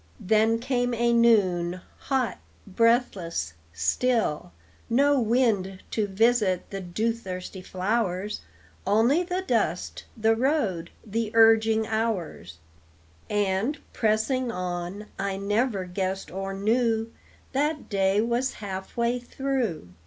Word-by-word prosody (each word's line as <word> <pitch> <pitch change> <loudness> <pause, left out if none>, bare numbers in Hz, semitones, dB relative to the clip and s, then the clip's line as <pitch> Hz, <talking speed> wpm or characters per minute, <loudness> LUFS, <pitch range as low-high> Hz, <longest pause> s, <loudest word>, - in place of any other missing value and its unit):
Then 220 +3 +3
came 245 0 0
a 235 +1 +2
noon, 185 -7 +3 0.2
hot, 255 -8 -1 0.3
breathless, 195 - +1 0.2
still, 150 - 0 0.4
No 280 +4 +4
wind 215 -5 +1
to 215 -2 0
visit 205 -2 +2
the 195 -1 -4
dew 215 +6 -1
thirsty 185 -4 -7
flowers, 190 +1 -1 0.5
Only 230 - +4
the 360 +1 -2
dust, 205 - -1
the 225 0 +3
road, 225 - 0 0.2
the 225 +1 -2
urging 225 -1 +5
hours; 205 - -3 0.7
And, 205 +6 0 0.2
pressing 230 +3 +1
on, 180 +1 -4
I 195 0 -1
never 205 0 0
guessed 190 +1 -3
or 195 +2 -4
knew 225 +3 +1 0.4
That 295 +2 -1
day 195 0 +2
was 240 +3 0
half 190 -1 -7
way 235 +1 +1
through. 245 - -2
220 Hz, 110 wpm, -26 LUFS, 190-235 Hz, 0.7 s, urging